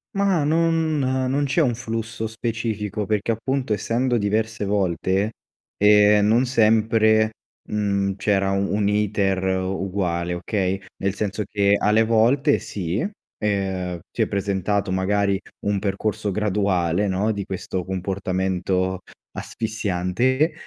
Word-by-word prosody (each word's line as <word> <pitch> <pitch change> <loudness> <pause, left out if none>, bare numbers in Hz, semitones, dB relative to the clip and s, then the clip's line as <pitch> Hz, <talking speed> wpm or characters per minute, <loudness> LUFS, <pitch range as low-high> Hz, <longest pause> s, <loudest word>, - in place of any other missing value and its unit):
Mah, 195 -6 +2
non 160 0 +1
non 130 +1 0
c'è 140 +5 +1
un 120 -6 +2
flusso 115 -1 -4
specifico, 110 -2 -3
perché, 105 +2 0
appunto, 125 +1 -1
essendo 120 +4 0
diverse 110 0 -1
volte, 95 +1 0 0.4
ehm, 105 0 +5
non 115 +4 +3
sempre, 110 -1 +3 0.4
mhmm, 100 -2 0
c'era 95 -1 +1
u 100 0 0
un' 105 -1 +1
iter 100 -2 +1
uguale, 95 -2 -1
okay, 95 +1 -1 0.2
nel 100 0 +1
senso 105 +1 -2
che, 100 -1 +2
alle 110 +2 +3
volte 115 +5 +3
si, 95 - -3 0.3
ehm, 95 -4 -2
si - - -3
è - - -1
presentato, 100 0 -1
magari, 100 +1 +1 0.3
un 100 -1 +1
percorso 100 +1 -2
graduale, 100 -2 +1
no, 100 +4 0
di 100 -2 -4
questo 95 -1 -4
comportamento 95 -1 -1 0.3
asfissiante, 110 - -1
105 Hz, 120 wpm, -23 LUFS, 95-110 Hz, 0.4 s, ehm